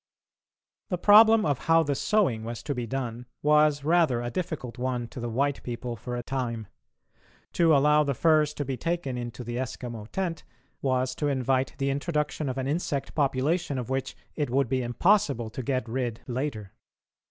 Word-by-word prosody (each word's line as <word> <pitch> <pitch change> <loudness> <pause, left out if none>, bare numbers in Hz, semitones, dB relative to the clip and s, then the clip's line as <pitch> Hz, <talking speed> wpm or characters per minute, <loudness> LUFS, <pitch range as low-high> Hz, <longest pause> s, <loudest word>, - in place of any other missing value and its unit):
The 180 - -1
problem 215 +3 +7
of 145 -3 -1
how 165 0 +5
the 145 -2 0
sewing 140 - +1
was 115 0 -6
to 145 - -2
be 120 -3 -4
done 125 -1 -4 0.2
was 150 -1 +4
rather 160 -6 +3
a 120 - -3
difficult 145 -7 -4
one 125 -2 -2
to - - -8
the 120 0 -3
white 140 +4 0
people 120 0 -5
for 120 +3 -6
a 120 - -4
time. 120 -4 -3 0.9
To 165 -3 +4
allow 150 +2 +4
the 140 -2 -1
furs 155 0 +3
to 145 - -3
be 130 -1 -3
taken 165 -3 -2
into 120 0 -5
the 120 +1 -4
Eskimo 120 -4 -5
tent 175 -4 -3 0.4
was 130 -1 0
to 145 - -2
invite 130 -1 0
the 135 0 0
introduction 150 0 -1
of 130 - -4
an 130 - -2
insect 145 -1 -2
population 145 +2 0
of 125 0 -4
which 135 0 -2 0.2
it 150 -4 -1
would 135 0 +1
be 130 0 +1
impossible 120 - +2
to 130 - -5
get 130 -1 -1
rid 120 -1 -3
later. 120 -6 -4
135 Hz, 180 wpm, -27 LUFS, 120-150 Hz, 0.9 s, problem